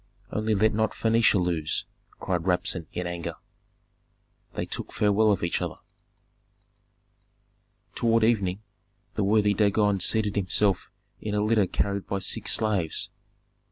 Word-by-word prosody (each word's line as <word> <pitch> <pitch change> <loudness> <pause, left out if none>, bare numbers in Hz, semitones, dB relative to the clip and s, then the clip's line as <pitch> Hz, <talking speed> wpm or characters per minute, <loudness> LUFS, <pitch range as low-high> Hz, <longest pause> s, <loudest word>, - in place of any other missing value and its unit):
Only 110 0 0
let 110 +2 +3
not 110 0 0
Phœnicia 115 -2 +3
lose!" 85 -4 -1 0.3
cried 90 -2 -2
Rabsun, 90 -2 +1
in 90 - -4
anger. 85 -1 -4 1.2
They - - -2
took - - -6
farewell 105 +1 +3
of 95 - 0
each 85 - -1
other. - - -3 2.2
Toward 115 -1 +2
evening 105 -3 +1 0.5
the 105 - -1
worthy 105 0 +3
Dagon 105 0 +2
seated 105 +2 +1
himself 100 0 +1 0.3
in 105 -1 -3
a 105 - +1
litter 105 -3 +3
carried 100 +2 -2
by 100 - -1
six 105 +3 -1
slaves. 100 -7 +1
100 Hz, 125 wpm, -26 LUFS, 90-110 Hz, 2.2 s, let